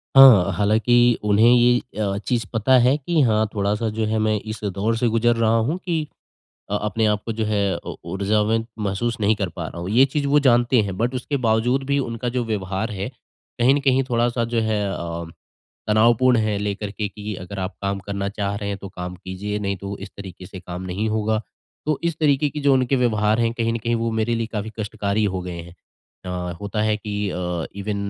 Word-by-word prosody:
हाँ, 120 -9 +9
हालाँकि 120 +4 +3
उन्हें 105 +3 +5
ये 120 0 +5 0.2
अ, 100 -2 0
चीज़ 115 +2 -1
पता 130 +4 +4
है 130 - +4
कि 160 +3 -1
हाँ 110 -4 +3
थोड़ा-सा 105 +2 0
जो 110 - +1
है 110 +1 0
मैं 110 0 +2
इस 110 +1 -7
दौर 105 +3 -1
से 120 - +1
गुज़र 115 +1 +2
रहा 115 0 +2
हूँ, 125 +10 0
कि 170 -4 -2 0.6
अ, 105 - +1
अपने 110 +1 0
आपको 105 +2 -1
जो 110 0 -2
है 100 -4 +1
उ - - -7 0.2
ऊर्जावान 105 +3 +1
महसूस 105 +3 -1
नहीं 105 +1 +3
कर 100 -3 -2
पा 85 -2 -3
रहा 85 - -8
हूँ। 90 - -4
ये 125 +5 +6
चीज़ 140 +1 -2
वो 145 +1 +4
जानते 120 -2 +4
हैं, 100 -3 -4
बट 120 +3 0
उसके 130 +3 -2
बावजूद 115 +4 +2
भी 140 0 +1
उनका 120 -2 -3
जो 120 0 -1
व्यवहार 105 0 -2
है, 100 +2 -4 0.5
कहीं 125 +3 +5
न 145 - +1
कहीं 135 -1 +3
थोड़ा-सा 120 0 +1
जो 115 0 -1
है 110 -1 0
अ, 85 -1 -4 0.6
तनावपूर्ण 120 +3 +4
है, 110 -2 0
लेकर 105 0 -3
के 105 0 -3
कि 105 +1 -6
अगर 95 +2 -7
आप 95 +2 -4
काम 100 0 -1
करना 100 0 -2
चाह 100 -1 -3
रहे 100 -1 -4
हैं, 100 -1 -3
तो 100 - -8
काम 90 -1 -6
कीजिए 95 +3 -5
नहीं 100 -1 -2
तो 100 +2 -6
इस - - -8
तरीके 95 -2 -9
से 95 0 -9
काम 90 0 -7
नहीं 95 +4 -2
होगा। 110 0 0 0.5
तो 155 -2 +1
इस 170 -2 0
तरीके 145 -1 +3
की 150 - -5
जो 140 -1 +3
उनके 130 +1 +2
व्यवहार 110 -3 +2
है, 115 0 +1
कहीं 115 -1 -1
न - - -1
कहीं 115 +1 -1
वो 115 0 0
मेरे 110 +1 0
लिए 115 -1 -1
काफ़ी 110 0 -3
कष्टकारी 105 0 -1
हो 95 -2 -1
गए 90 - -6
हैं। 85 +1 -13 0.5
अ, 90 -1 -3
होता 105 +1 -2
है 110 0 +2
कि 105 -1 -3
अ, 90 -2 -3
इवन 100 +1 -3
110 Hz, 220 wpm, -22 LUFS, 100-120 Hz, 0.6 s, हाँ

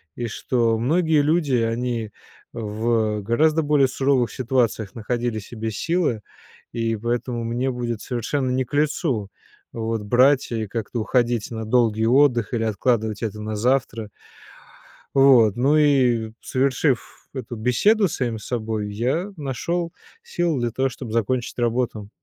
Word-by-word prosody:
и 120 - -3
что 115 +1 0
многие 155 +5 +2
люди, 150 -3 +2
они 115 -1 -1 0.4
в 110 -1 -1
гораздо 155 +9 +2
более 145 -2 +3
суровых 130 -1 +1
ситуациях 120 -5 0
находили 120 0 -2
в 100 - -11
себе 110 -1 -5
силы. 150 - 0 0.5
И 115 -1 -1
поэтому 120 +1 -2
мне 125 +3 -1
будет 120 -3 -4
совершенно 130 +2 -2
не 130 0 0
к 125 - -23
лицу, 145 - 0 0.4
вот, 115 -1 -3
брать 130 +6 +3
и 110 -2 -2
как-то 115 +3 -4
уходить 120 -1 0
на 110 -1 -4
долгий 110 -1 +2
отдых 125 -2 +3
или 115 -1 0
откладывать 110 0 0
это 110 -1 -3
на 110 0 -4
завтра. 115 -1 0 1.1
Вот, 130 -6 +6
ну 140 +5 +3
и, 125 -7 +3
совершив 130 -2 -1
эту 130 -2 -5
беседу 190 - +3
с - - -5
самим 120 -4 -2
собой, 110 -2 -3
я 135 - -1
нашёл 165 +5 -3 0.3
силы 175 - -1
для 120 -1 -1
того 135 +3 0
чтоб 120 -2 -8
закончить 115 +2 -1
работу. 115 -3 -1
120 Hz, 140 wpm, -23 LUFS, 110-135 Hz, 1.1 s, Вот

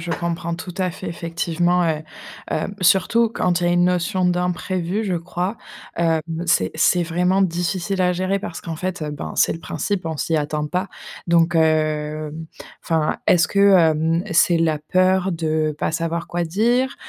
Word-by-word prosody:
je 170 +1 -5
comprends 170 0 -2
tout 180 +1 -8
à 185 -2 0
fait. - - -9
Effectivement, 170 +1 0
heu 155 -1 -1 0.5
heu, 155 - -1 0.2
surtout 200 +5 +3
quand 180 -6 0
il - - +2
y - - +2
a - - +2
une 175 0 +3
notion 180 +1 +1
d'imprévu, 180 +2 -1
je 190 -3 -1
crois, 180 +4 -3 0.4
hem, 165 -1 +2 0.2
c'est 95 - +2
c'est 175 +3 +3
vraiment 180 +3 +1
difficile 185 +1 -1
à 180 0 +2
gérer 185 +2 -1
parce 170 - -7
qu'en 165 -1 -6
fait, 185 +1 -4
heu, 150 -1 -3
ben 145 - -6
c'est - - +3
le 165 - -9
principe, 200 0 -3
on 160 -1 -3
s'y 165 - 0
attend 150 0 -1
pas. 180 +5 -2 0.4
Donc, 170 0 +3
hem 155 0 0 0.4
enfin, 160 -2 0
est-ce 175 -2 +4
que, 200 - -2
hem, 165 -1 +3
c'est 170 +1 +4
la 160 -2 +1
peur 185 +4 +1
de 155 -2 -1
pas - - -1
savoir 165 +1 -2
quoi 175 0 -2
dire? 240 +10 +1
170 Hz, 180 wpm, -21 LUFS, 160-185 Hz, 0.5 s, est-ce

